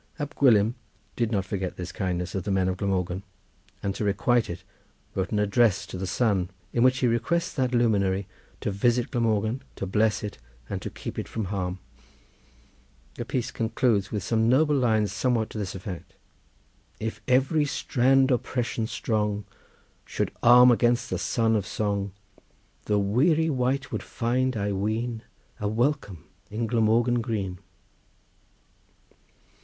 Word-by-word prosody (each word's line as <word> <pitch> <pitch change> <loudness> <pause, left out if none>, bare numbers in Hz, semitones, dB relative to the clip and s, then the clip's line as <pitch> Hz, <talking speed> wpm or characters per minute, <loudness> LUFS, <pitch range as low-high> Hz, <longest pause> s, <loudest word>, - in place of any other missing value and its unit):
Ab 145 -1 -4
Gwilym 115 -5 +4 0.4
did 115 -2 0
not 100 -4 0
forget 95 -2 -3
this 90 -1 -5
kindness 90 -2 -2
of 95 - -2
the 105 - -4
men 95 -1 +2
of 95 0 -1
Glamorgan, 90 -1 -1 0.6
and 100 - -1
to 100 - -4
requite 110 +4 +2
it 85 - -6 0.5
wrote 95 -1 -2
an 105 - 0
address 105 0 +3
to - - -9
the 95 +1 -3
sun, 95 -3 +1 0.2
in 120 - +1
which 130 +1 +5
he 130 - +2
requests 170 +9 0
that 130 -3 0
luminary 100 -5 +2 0.3
to - - -1
visit 120 +4 +1
Glamorgan, 115 +1 0
to - - -4
bless 105 +3 +1
it 105 -9 -6 0.3
and - - -4
to - - -4
keep - - -6
it - - -4
from 110 -3 -3
harm. 90 -1 -2 1.4
The 120 - -5
piece 125 0 -2
concludes 115 -2 0
with 105 - -2
some 115 0 +2
noble 150 +4 +4
lines 110 -6 +2
somewhat 110 +2 0
to 110 - -5
this 100 -3 -4
effect:— 95 -2 -7 0.8
"If 110 0 -4
every 135 +4 +3
strand 135 -1 +2
oppression 120 -2 -1
strong 105 -3 -1 0.6
Should - - -2
arm 125 +1 +8
against 120 0 +2
the - - -1
son 115 -1 +1
of 100 -3 -1
song, 100 -2 -1 0.7
The 105 - +2
weary 150 - +2
wight 135 +1 0
would - - -2
find, 130 +1 -1
I 100 0 -1
ween, 110 +4 -2 0.4
A 105 - -1
welcome 110 - -1 0.2
in 110 +3 -2
Glamorgan 115 +2 +2
green." 100 -6 -3
110 Hz, 150 wpm, -26 LUFS, 100-125 Hz, 1.4 s, arm